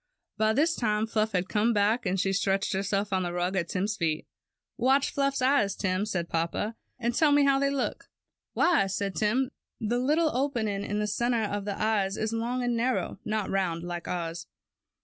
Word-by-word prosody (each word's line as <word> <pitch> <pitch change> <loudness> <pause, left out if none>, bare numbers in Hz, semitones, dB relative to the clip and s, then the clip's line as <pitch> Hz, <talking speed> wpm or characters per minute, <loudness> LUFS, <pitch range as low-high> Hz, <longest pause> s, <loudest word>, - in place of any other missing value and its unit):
By 215 +1 +2
this 315 +7 +2
time 215 -2 +1
Fluff 220 -1 0
had 180 0 0
come 220 +3 +2
back, 210 +2 +2
and 190 +1 0
she 195 +1 +1
stretched 195 0 +1
herself 200 +1 -1
on 190 - +2
the 175 -1 -2
rug 180 +2 -1
at 175 -3 0
Tim^s 200 +3 -1
feet. 160 -3 0
^ - - -51 0.5
Watch 265 +3 +2
Fluff's 275 -1 0
eyes, 255 -7 +3
Tim," 190 +1 -1
said 175 -4 -2
papa, 170 +7 -2 0.2
^^and 235 0 -1
tell 305 +1 +4
me 290 0 +5
how 275 -1 +4
they 280 0 +2
look." 275 -2 -3 0.5
^Why," 310 - +3
said 195 0 -2
Tim, 245 +7 +1 0.3
^The 240 +3 0
little 310 +2 +2
opening 230 -7 -1
in 205 - -2
the 210 - 0
center 235 +2 0
of 205 -1 -2
the 200 -1 -3
eye 215 -2 +2
is 215 +3 -3
long 240 +2 -1
and 245 -1 0
narrow; 230 -6 -1
not 215 -3 -2
round 175 -4 0
like 175 -1 -5
ours." 170 -1 -4
210 Hz, 200 wpm, -28 LUFS, 195-245 Hz, 0.5 s, me